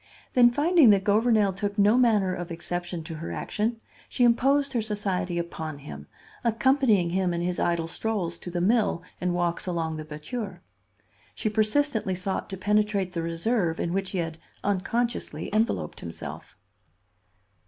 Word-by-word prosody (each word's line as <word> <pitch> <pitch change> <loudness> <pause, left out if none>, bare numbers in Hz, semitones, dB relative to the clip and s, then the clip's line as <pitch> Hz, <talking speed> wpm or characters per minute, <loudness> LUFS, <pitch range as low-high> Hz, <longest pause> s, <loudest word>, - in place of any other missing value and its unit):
Then 245 -1 +7
finding 300 +1 +5
that 200 -2 +5
Gouvernail 215 -1 +3
took 205 +2 -3
no 205 +2 +5
manner 215 -7 +3
of 175 0 -5
exception 175 0 -4
to 165 +1 -7
her 165 - -6
action, 225 +2 -2 0.3
she 245 - +1
imposed 275 +4 +3
her 235 - +1
society 195 -4 -2
upon 160 -3 -4
him, 75 - -10 0.4
accompanying 230 -6 +3
him 180 -1 +1
in 170 - -2
his 175 0 -1
idle 170 -1 0
strolls 180 -3 -2
to - - -7
the 175 0 -2
mill 205 -3 +2 0.2
and 180 -1 0
walks 175 +1 -1
along 165 -3 -2
the 155 - -5
batture. 155 +9 -6 0.8
She 215 - -1
persistently 215 -1 +1
sought 190 +1 -3
to 190 - -5
penetrate 205 -1 +1
the 170 -2 -3
reserve 170 +1 0
in 170 - -1
which 195 0 -1
he 190 - -4
had 165 -2 -3 0.2
unconsciously 205 -4 -1
enveloped 220 +2 0
himself. - - -8
195 Hz, 155 wpm, -26 LUFS, 170-225 Hz, 0.8 s, Then